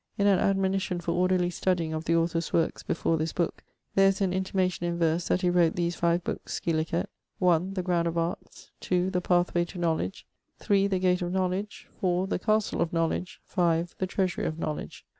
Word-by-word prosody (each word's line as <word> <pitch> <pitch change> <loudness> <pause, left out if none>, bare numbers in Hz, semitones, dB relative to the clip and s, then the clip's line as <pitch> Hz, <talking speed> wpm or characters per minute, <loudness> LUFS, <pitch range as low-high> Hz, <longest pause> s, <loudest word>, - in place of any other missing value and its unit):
In 200 - +2
an 195 -3 +5
admonition 195 -2 +1
for 170 - -2
orderly 180 0 +2
studying 175 -3 0
of 155 +1 -4
the 170 - +2
author's 165 0 0
workes 165 -1 +1
before 165 - 0
this 160 +1 -2
booke 170 -2 -2 0.3
there 195 0 +5
is 195 0 +1
an 190 -2 +1
intimation 185 -1 -1
in 170 0 -2
verse 165 0 +1
that 180 - +1
he 180 - +2
wrote 175 -2 +3
these 175 0 -1
five 170 0 +1
bookes, - - -4
scilicet, 165 +2 0 0.3
(1) 180 +1 +2
The 185 - -1
Ground 175 -2 +1
of 170 0 -2
Arts, 165 +1 -4
(2) 180 +1 0
the 180 -1 0
Pathway 175 -1 +2
to 180 - -10
Knowledge, 160 - -1 0.3
(3) 200 -1 +2
the 195 -2 0
Gate 180 0 +2
of 175 0 -2
Knowledge, 190 +2 -2
(4) 180 0 +1
the 190 - -2
Castle 215 +2 +1
of 170 - 0
Knowledge, 165 +2 -1
(5) 170 -1 +1
the 185 - 0
Treasury 185 -1 -1
of 155 - -4
Knowledge. 155 -2 -5
175 Hz, 200 wpm, -28 LUFS, 170-185 Hz, 0.3 s, an